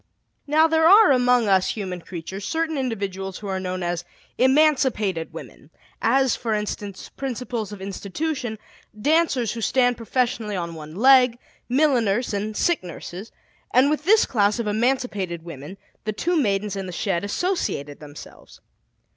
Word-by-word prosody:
Now, 310 +2 +4
there 320 0 +3
are 405 -1 +8
among 250 -3 +3
us 190 -2 +3
human 185 -4 -5
creatures 185 +3 -7
certain 320 - -1
individuals 195 -7 -3
who 210 - -8
are 190 -1 -2
known 185 -1 -4
as 175 0 -2 0.4
"emancipated 260 - +2
women," - - -11 0.3
as, 265 +2 +3
for 225 -3 -2
instance, 205 -2 -5
principals 245 -5 -4
of 200 -2 -8
institutions, 220 +5 -4 0.4
dancers 285 -4 +2
who 230 - -5
stand 245 +1 +2
professionally 230 -3 -1
on 170 -2 -4
one 155 0 -9
leg, 250 +1 +5 0.3
milliners, 245 -5 +2
and 210 +1 -3
sick 345 - +1
nurses; 180 +4 -8 0.4
and 265 +3 +5
with 305 0 -1
this 430 +4 +5
class 210 -3 +1
of 235 - -2
emancipated 210 -6 -1
women 165 +2 -9 0.3
the 215 - -1
two 345 +12 -1
Maidens 205 - 0
in 195 -1 -4
the - - -6
shed 180 0 -1
associated 205 - -2
themselves. 150 -1 -13
220 Hz, 145 wpm, -23 LUFS, 190-265 Hz, 0.4 s, are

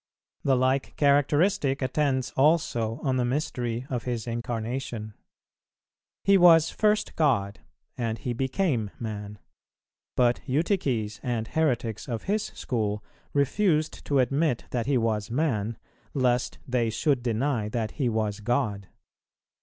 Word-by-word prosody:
The 135 - +3
like 130 +2 +1
characteristic 145 0 +2
attends 130 -1 0
also 130 -6 +2
on 130 -3 +1
the 125 - +2
mystery 125 -3 -2
of 125 -4 -3
His 120 -3 -2
Incarnation. 115 -1 -4 1.1
He 195 -1 +5
was 165 -2 +7
first 210 0 +1
God 115 -11 +1 0.4
and 115 -2 -1
He 120 +3 -3
became 130 - 0
man; 105 -2 -5 0.8
but 120 -1 +3
Eutyches 130 - 0
and 115 -3 -2
heretics 120 -9 0
of 115 -2 -3
his 210 +2 0
school 105 -4 -3 0.3
refused 155 +2 +1
to 140 - +1
admit 135 +1 +1
that 120 -1 -1
He 140 -2 +3
was 110 -3 0
man, 115 -5 -1 0.4
lest 125 -2 +1
they 120 -3 +1
should 130 +4 +1
deny 120 -1 0
that 110 -1 -2
He 130 -5 -1
was 110 -2 -1
God. 105 -4 -1
125 Hz, 125 wpm, -27 LUFS, 115-145 Hz, 1.1 s, was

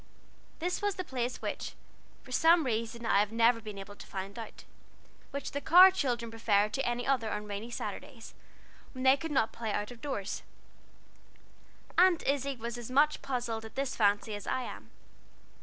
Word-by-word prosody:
This 355 +2 -2
was 410 -1 0
the 370 - -3
place, 250 -5 -3
which - - -4 0.5
for 255 - -13
some 325 +4 +5
reason 230 0 -2
I 200 - +4
have 205 +1 +1
never 230 +1 +3
been 210 -2 -8
able 195 +1 -8
to - - -12
find 195 +3 -6
out, 225 - -9 0.7
the 280 0 -4
Carr 365 +5 +9
children 245 -10 -1
preferred 215 -2 +2
to 270 - 0
any 240 0 -1
other 250 -5 +1
on 210 0 -3
rainy 205 +3 -5
Saturdays, 240 - -7 0.6
when 260 -1 -5
they 265 0 +7
could 325 +3 -5
not 265 -7 +1
play 225 -2 -3
out 205 0 -2
doors, 265 -9 -3 1.6
Aunt 360 -2 +5
Izzie 275 0 0
was 235 0 -5
as 240 - -7
much 295 +4 +3
puzzled 240 -4 -3
at 220 - -11
this 275 -1 -2
fancy 205 0 +2
as 205 -1 -6
I 260 0 0
am. - - -8
240 Hz, 175 wpm, -31 LUFS, 220-275 Hz, 1.6 s, Carr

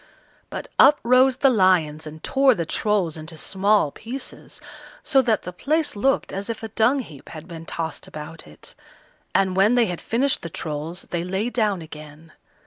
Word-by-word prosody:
But - - -6
up 290 +2 +7
rose 255 +2 +4
the 270 -1 +4
lions 170 -8 +2
and 155 +1 -10
tore 270 -2 +4
the 170 - -2
Trolls 190 -3 0
into 160 +1 -8
small 195 -3 +2
pieces, 250 - -7 0.4
so 270 -3 +4
that 230 -5 +1
the 180 - -7
place 305 - -1
looked 270 +7 0
as 200 +3 -4
if 230 0 -5
a 225 - -5
dung 240 +6 +2
heap 150 - -13
had 160 +1 -10
been 165 -2 -9
tossed 165 -1 -4
about 155 - -9
it; 75 - -12 0.6
and 190 -1 +2
when 200 +5 +4
they 240 -2 +4
had 175 -4 -4
finished 260 +4 0
the 170 - -6
Trolls 155 +2 -5
they 170 -1 -1
lay 190 +6 -2
down 210 -8 0
again. 155 +1 -12
190 Hz, 180 wpm, -23 LUFS, 160-235 Hz, 0.6 s, up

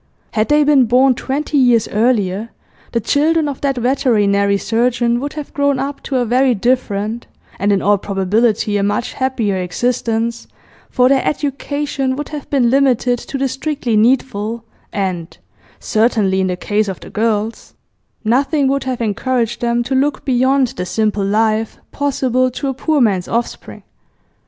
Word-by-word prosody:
Had 215 0 0
they 295 0 +4
been 285 -3 +4
born 255 +3 +4
twenty 285 +4 -2
years 245 -4 +3
earlier, 215 -2 0 0.4
the 235 - 0
children 300 +6 +1
of 280 -2 -5
that 275 -2 0
veterinary 210 -6 +2
surgeon 235 +2 0
would 285 +3 -4
have 300 -2 -7
grown 285 -1 +1
up 275 +2 -4
to 270 - -4
a 250 -1 +2
very 250 +2 +2
different, 225 -1 -1 0.3
and 200 +2 +1
in 200 - +1
all 205 0 +3
probability 205 +2 0
a - - 0
much 205 +4 -1
happier, 250 -7 -1
existence, 230 +4 -2 0.4
for 250 0 +3
their 265 0 +3
education 285 -1 -2
would 295 +1 -5
have 295 -2 -7
been 250 -5 +2
limited 255 -3 +2
to 275 - -6
the 270 0 0
strictly 270 -3 -2
needful, 230 -1 +1 0.3
and 185 -4 -3 0.4
certainly 215 -4 +1
in 190 - +1
the 180 -1 -2
case 205 +3 0
of 190 -2 -5
the - - -11
girls 220 0 -2 0.5
nothing 270 +5 +2
would 275 0 0
have 255 -2 -3
encouraged 235 +2 -1
them 240 0 +1
to 265 - -3
look 275 +2 0
beyond 260 0 +2
the 180 - -5
simple 210 0 0
life 215 +2 0
possible 255 -3 0
to 265 +3 -4
a - - -1
poor 300 +3 0
man's 195 -6 +1
offspring. 235 +1 -4
240 Hz, 160 wpm, -17 LUFS, 215-270 Hz, 0.5 s, they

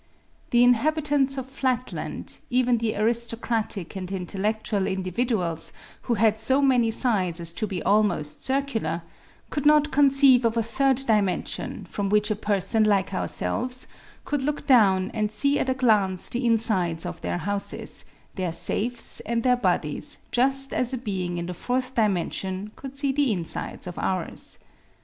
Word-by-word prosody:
The 240 0 +4
inhabi 285 +6 +3
tants 280 -2 +1
of 265 - -3
Flatland, 260 -2 -3
even 250 -1 +2
the 225 -1 -1
aristocratic 225 -3 -1
and 185 -1 -5
intellectual 200 +2 -2
individuals 185 -3 -1 0.3
who 240 - -1
had 220 0 +2
so 260 +5 +3
many 255 -5 +3
sides 200 -8 +1
as 170 -1 -2
to 215 - -3
be 190 -4 -4
almost 200 -8 +1
circular, 230 - -1 0.5
could 290 -1 0
not 300 0 +4
conceive 275 -2 +5
of 230 0 +1
a 230 - +2
third 265 +3 +1
dimension 210 -5 -1
from 200 -1 -3
which 210 +1 +2
a - - +1
person 205 +1 +1
like 200 -2 +1
ourselves 250 +6 -2 0.4
could 290 -2 -1
look 295 +1 -2
down 195 -8 +4
and 215 -2 -1
see 280 +7 +2
at 265 - -1
a 260 - +1
glance 210 -7 +3
the 245 0 -1
insides 195 -8 +2
of - - -6
their - - -2
houses, 200 +4 -3 0.3
their 185 -3 -2
safes 230 +8 +1
and 230 +1 -2
their 250 -1 +4
bodies 180 -9 -1
just 270 +2 +1
as 255 +1 0
a - - -1
being 185 -7 -3
in 170 - -3
the 180 - -5
fourth 255 +7 -2
dimension 195 -1 -1
could 275 0 -9
see 280 -1 +3
the 280 -2 +1
insides 175 -5 -2
of 180 -1 -7
ours. 185 -2 -2
225 Hz, 160 wpm, -25 LUFS, 190-255 Hz, 0.5 s, conceive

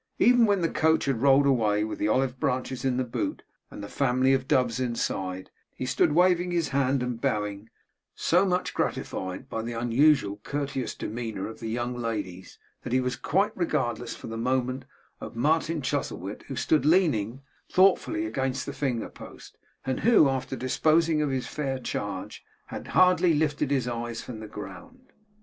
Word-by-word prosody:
Even 245 -1 +5
when 200 -2 +2
the 165 - +2
coach 160 0 +2
had 135 -5 -1
rolled 140 +1 +5
away 110 -6 +2
with 110 - -4
the 105 - +1
olive 130 +3 +1
branches 130 0 -2
in 130 -2 +1
the 130 - +1
boot 120 - -3 0.3
and - - -9
the - - -5
family 130 +2 +2
of 130 0 0
doves 125 -3 +2
inside, 95 -7 -3 0.2
he - - -4
stood 150 +4 +2
waving 180 +1 +3
his 170 -3 0
hand 135 -1 +1
and 125 -2 -4
bowing; 105 -4 -2 0.5
so 180 +3 +3
much 180 -2 0
gratified 95 -1 -3
by 110 - -3
the 120 +1 -5
unusually 120 -2 +2
courteous 140 -1 -3
demeanour 110 -4 -4
of 110 - -9
the 115 - -5
young 120 +2 -2
ladies, 105 -6 -5 0.2
that 125 - -5
he 130 - +4
was 125 -1 -1
quite 200 +11 0
regardless, 120 -9 -1
for - - -11
the 115 - -5
moment, 130 +2 -1 0.3
of - - -8
Martin 155 +4 +1
Chuzzlewit, - - -3
who - - -5
stood 155 -4 +2
leaning 140 - +2 0.3
thoughtfully 195 - +3
against 135 - -2
the 140 - -5
finger 125 -6 -2
post, - - -13 0.3
and 130 -1 -1
who 225 -10 +5
after 135 0 -2
disposing 155 +5 +2
of 150 - 0
his 130 -1 -2
fair 135 -3 -3
charge 100 -6 -5 0.2
had - - -8
hardly 180 -2 +5
lifted 150 -2 0
his 135 -4 0
eyes 120 -1 -4
from 115 -3 -8
the 110 - -8
ground. 105 - -10
130 Hz, 175 wpm, -27 LUFS, 115-150 Hz, 0.5 s, Even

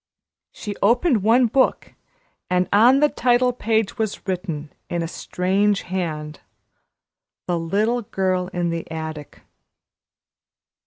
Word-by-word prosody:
She 210 -2 -6
opened 240 - +3
one 235 +5 +4
book, 260 +3 +1 0.6
and 180 0 +1
on 245 +7 +6
the 300 - +6
title 250 -1 +2
page 225 -2 -1
was 220 -2 -3
written 170 -5 -4 0.2
in 170 -1 -1
a - - -3
strange 195 +4 0
hand, 155 -5 -4 1.1
"The 175 -1 -1
little 210 +9 0
girl 185 -3 -1
in 175 -2 -2
the 165 0 -5
attic." 160 -2 -7
190 Hz, 115 wpm, -22 LUFS, 170-230 Hz, 1.1 s, on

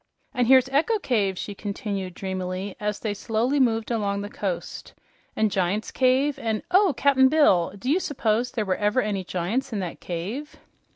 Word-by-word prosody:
"And 245 -2 +1
here's 260 0 +6
Echo 310 +12 +2
Cave," 205 - 0
she 205 - -5
continued, 200 -2 -4
dreamily, 190 0 -4
as 210 0 -2
they 215 -2 -1
slowly 230 +7 0
moved 225 -3 +1
along 200 -3 -1
the 205 - -7
coast, 185 -4 -5 0.4
"and 215 -1 +1
Giant's 190 +3 -1
Cave, 265 +3 +2
and 220 +1 -2
oh, 375 -4 +4
Cap'n 265 -2 +5
Bill! 265 - +4
Do 225 - -8
you 310 +7 +3
s'pose 240 - 0
there 215 - -2
were 190 -1 0
ever 210 +5 +1
any 200 -3 -2
giants 185 +10 -2
in 220 - -2
that 175 -2 -5
cave?" 200 - -5
215 Hz, 175 wpm, -25 LUFS, 195-260 Hz, 0.4 s, here's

